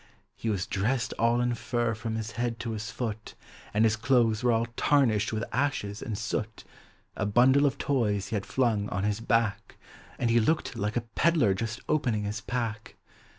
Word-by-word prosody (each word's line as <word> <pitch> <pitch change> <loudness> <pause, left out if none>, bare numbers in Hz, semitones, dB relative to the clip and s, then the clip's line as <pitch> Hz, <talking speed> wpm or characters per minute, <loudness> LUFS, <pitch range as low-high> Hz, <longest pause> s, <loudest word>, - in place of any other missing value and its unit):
He 115 - -3
was 95 -4 -1
dressed 115 +5 -1
all 115 +1 +3
in 120 0 +1
fur 120 -1 -1
from 110 0 -4
his 110 0 -4
head 120 -1 -2
to 115 - -3
his 110 +1 -4
foot, 110 -3 -5 0.4
And 105 +2 +2
his 110 0 +3
clothes 115 -2 +2
were 125 -1 +3
all 115 0 +2
tarnished 115 -8 +2
with 110 0 -2
ashes 115 -6 -1
aud 110 -3 -4
soot; 110 0 -3 0.5
A 100 - -1
bundle 130 +7 +5
of 140 0 -2
toys 110 -9 0
he 115 - -2
had 100 -1 -3
Hung 110 -6 +1
on 95 - -2
his 105 +1 0
back, 115 -2 0 0.4
Aud 120 -1 +1
he 120 - +5
looked 155 +2 0
like 105 +1 -2
a - - +1
pedler 155 - +3
just 115 +4 -4
opening 120 -9 +1
his 105 +1 -3
pack. 115 -2 -4
115 Hz, 190 wpm, -28 LUFS, 105-120 Hz, 0.5 s, bundle